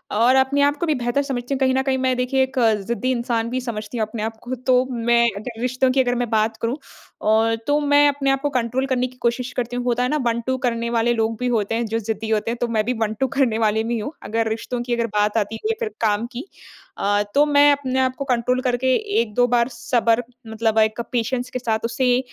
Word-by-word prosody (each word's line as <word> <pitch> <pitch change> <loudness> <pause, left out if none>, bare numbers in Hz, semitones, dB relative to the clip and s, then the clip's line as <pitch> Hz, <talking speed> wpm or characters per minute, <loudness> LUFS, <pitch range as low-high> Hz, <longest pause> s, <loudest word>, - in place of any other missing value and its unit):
और 240 +4 +4
अपने 265 +2 +3
आप 285 0 +3
को 345 - 0
भी 310 - +2
बेहतर 240 +3 0
समझती 265 -1 -3
हूँ 270 - -2
कहीं 260 -1 +2
न 265 - +2
कहीं 265 -1 0
मैं 260 0 +1
देखिए 255 +1 +1
एक 265 0 -5
अ, 225 -2 +4
ज़िद्दी 235 +5 -2
इंसान 235 -2 -1
भी 255 +1 -2
समझती 230 -1 -5
हूँ 220 - +1
अपने 215 0 -5
आप 225 0 -4
को 255 +1 -4
तो 255 0 +2
मैं 235 0 +2
अगर 225 +2 -7
रिश्तों 255 +1 +1
की 265 - +3
अगर 245 -1 0
मैं 245 -1 -2
बात 220 0 +1
करूँ 235 +5 -1 0.5
और 225 +1 +3
तो 290 +1 +3
मैं 290 0 +5
अपने 275 -1 -1
आप 270 0 0
को 290 - 0
कंट्रोल 250 0 -1
करने 255 -1 0
की 255 0 -17
कोशिश 245 +1 -1
करती 245 0 -2
हूँ। 245 - -2
होता 245 0 +1
है 250 - 0
ना, 300 - +1
1-2 235 +2 0
करने 235 -3 -1
वाले 235 0 +2
लोग 225 0 -1
भी 250 - -1
होते 225 -2 0
हैं, 235 0 -1
जो 225 +1 -2
ज़िद्दी 220 0 -4
होते 220 +1 0
हैं, 240 - -4
तो 240 - +1
मैं 220 -2 0
भी 250 - 0
1-2 220 +4 0
करने 250 -6 +2
वाले 220 0 +1
में 235 - -2
ही 225 - -2
हूँ। 250 +8 -4
अगर 225 +1 -1
रिश्तों 240 +2 -3
की 240 0 -2
अगर 235 -1 -1
बात 210 +1 +2
आती 215 0 -1
है 430 - -4
या 450 - -2
फिर 455 -2 -2
काम 215 0 +1
की। 255 +4 -6 0.5
अ, 205 +1 +1
तो 290 +1 +5
मैं 290 0 +5
अपने 265 -2 0
आप 260 -1 +1
को 275 - -5
कंट्रोल 250 0 +1
करके 250 0 0 0.3
1-2 235 +2 +1
बार 240 0 +2
सब्र 235 -1 +1 0.2
मतलब 220 0 -1
एक 215 +1 +2
पेशेंस 245 +1 -1
के 255 0 -4
साथ 225 -3 -1
उसे 245 +2 +2
240 Hz, 255 wpm, -21 LUFS, 225-260 Hz, 0.5 s, मैं